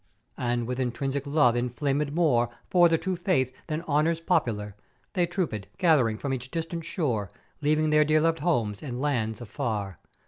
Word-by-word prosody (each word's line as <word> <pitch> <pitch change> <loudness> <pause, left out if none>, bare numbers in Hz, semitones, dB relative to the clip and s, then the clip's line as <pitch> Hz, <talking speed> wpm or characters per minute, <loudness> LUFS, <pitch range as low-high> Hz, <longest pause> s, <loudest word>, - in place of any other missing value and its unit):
"And 120 -1 0
with 125 +2 -3
intrinsic 135 +3 -2
love 140 -5 +4
inflamèd 135 +4 -1
more 140 -8 +2 0.2
for 175 -2 +6
the 165 - +3
True 185 +2 -2
Faith, 170 -8 0
than 155 +1 -3
honours 160 +1 +1
popular, 115 - 0 0.4
they 175 -4 +2
troopèd, 165 - -2
gath'ering 135 -11 +3
from 135 +3 -3
each 125 0 -5
distant 165 +1 -4
shore, 120 - -1 0.3
leaving 155 +1 +2
their 150 0 +6
dear 155 +1 +3
loved 165 0 +2
homes 120 - 0
and 125 -4 -5
lands 120 -6 -1
afar. 105 -5 -3
140 Hz, 165 wpm, -27 LUFS, 120-165 Hz, 0.4 s, for